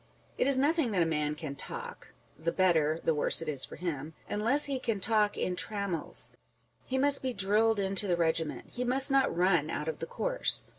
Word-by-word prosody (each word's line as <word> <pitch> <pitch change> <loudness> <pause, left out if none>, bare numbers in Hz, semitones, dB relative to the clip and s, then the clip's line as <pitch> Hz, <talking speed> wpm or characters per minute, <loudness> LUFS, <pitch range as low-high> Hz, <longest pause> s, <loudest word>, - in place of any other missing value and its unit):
It - - 0
is 275 -1 +6
nothing 295 0 +2
that 180 -3 +3
a - - 0
man 150 -2 -1
can 150 -2 -6
talk 140 - -8 0.2
(the 165 +3 -2
better, 160 -4 +2
the 165 - +2
worse 150 - +1
it 165 - -6
is 140 -4 0
for - - -11
him) 160 -3 -5
unless 235 +8 +2
he 275 -2 -2
can 230 -5 -2
talk 210 0 +1
in 180 - -1
trammels; 200 -4 -1 0.6
he 260 - -1
must 280 +1 +2
be 260 -1 -2
drilled 215 +2 +2
into 195 +1 +3
the 175 -2 +1
regiment; 160 -2 -2
he 250 - -4
must 265 +3 +3
not 270 -7 +2
run 175 -4 +2
out 150 - -4
of 160 - -4
the - - -5
course - - +1
195 Hz, 205 wpm, -30 LUFS, 160-255 Hz, 0.6 s, is